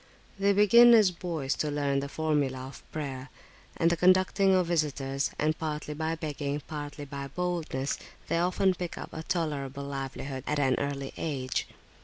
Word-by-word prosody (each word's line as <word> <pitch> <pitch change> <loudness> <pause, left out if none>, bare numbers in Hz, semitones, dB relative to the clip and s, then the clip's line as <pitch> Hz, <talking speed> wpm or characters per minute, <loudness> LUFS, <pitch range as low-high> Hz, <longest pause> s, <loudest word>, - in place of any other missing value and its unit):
They 200 +1 +4
begin 235 +4 +8
as 210 -5 +6
boys 165 -6 -2
to 150 - 0
learn 145 -1 0
the 140 0 -4
formula 145 -4 0
of 130 -1 -12
prayer, 140 -3 -5 0.5
and 165 +1 +3
the - - +3
conducting 185 +2 +4
of 185 -1 +3
visitors; 140 -5 0
and 155 +1 +1
partly 150 -1 -4
by 160 +2 -2
begging, 145 -2 -3
partly 145 -1 -6
by 140 0 -6
boldness, 160 -4 -2 0.3
they 165 - +1
often 185 +2 +2
pick 180 -1 -5
up - - -7
a 160 - -5
tolerable 145 -6 -2
livelihood 135 -1 -5
at 150 - 0
an 135 -3 +3
early 140 -1 -3
age. 135 -5 -2
150 Hz, 165 wpm, -29 LUFS, 140-175 Hz, 0.5 s, begin